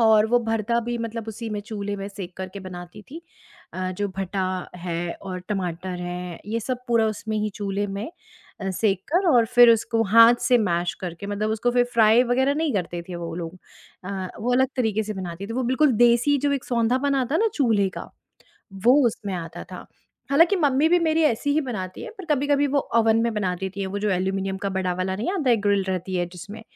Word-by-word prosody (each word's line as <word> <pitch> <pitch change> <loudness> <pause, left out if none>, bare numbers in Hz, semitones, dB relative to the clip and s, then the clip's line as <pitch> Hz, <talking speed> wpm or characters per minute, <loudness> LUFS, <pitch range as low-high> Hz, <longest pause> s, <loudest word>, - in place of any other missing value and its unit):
और 220 -1 +5
वो 245 - +4
भरता 225 +1 0
भी 240 0 -1
मतलब 230 -1 -5
उसी 225 +1 -6
में 210 -1 -3
चूल्हे 205 -1 -5
में 195 0 -5
सेक 190 -3 -9
कर 190 0 -5
के 200 - -6
बनाती 180 +2 -9
थीं 325 - -8 0.5
अ, 185 0 -2
जो 205 +3 -2
भटा 195 0 -2 0.4
है 170 -1 -3
और 185 -1 -5
टमाटर 180 -2 -3
है, 175 -1 -5
ये 225 +2 -1
सब 250 +2 -4
पूरा 230 -2 +3
उसमें 215 0 -3
ही 210 0 -1
चूल्हे 200 0 -2
में 200 +9 -5 0.5
अ, 195 - -2
सेक 195 0 0
कर 365 +2 +3
और 235 -5 +4
फिर 245 -1 +9
उसको 225 0 +2
हाथ 230 +1 +8
से 250 -1 +4
मैश 175 -5 0
करके, 180 +2 -6
मतलब 205 +1 -2
उसको 220 +2 0
फिर 245 0 +4
फ्राई 225 +1 +6
वगैरह 265 +3 +2
नहीं 315 -1 0
करते 175 -3 -2
थे 180 - -5
वो 170 -1 -5
लोग। 175 +1 -6 0.5
अ, 190 -1 -4
वो 245 +3 0
अलग 260 +1 +3
तरीके 220 -3 +1
से 215 - -4
बनाती 185 0 -6
थी, 225 - -6
वो 255 +2 -1
बिल्कुल 260 +3 +3
देसी 240 +5 +4
जो 285 - +2
एक 275 -2 -2
सौंधापन 255 +4 +1
आता 265 +1 0
है - - +1
ना 450 - +3
चूल्हे 220 -8 +2
का, - - -8 0.6
वो 225 +7 +4
उसमें 205 -3 -3
आता 165 -2 -6
था। - - -8 0.4
हालाँकि 335 +8 +5
मम्मी 290 -2 +3
भी 355 - +5
मेरी 320 -1 +2
ऐसी 285 0 +1
ही 310 - +3
बनाती 190 -8 -5
हैं, - - -7
पर 380 - -7
कभी-कभी 285 +1 +1
वो 280 - +1 0.2
ओवन 225 -1 +4
में 235 - 0
बना 190 -4 0
देती 190 +2 -5
हैं, 195 - -1
वो 200 +2 -3
जो 210 0 0
एल्यूमीनियम 190 +1 -1
का 200 - 0
बड़ा 185 -1 0
वाला 185 +1 -2
नहीं 225 - -2
आता 310 -10 +1
है, 235 - +5
ग्रिल 200 -1 +3
रहती 185 0 -3
है 175 0 0
जिसमें, 205 +5 -9
215 Hz, 220 wpm, -24 LUFS, 190-245 Hz, 0.6 s, फिर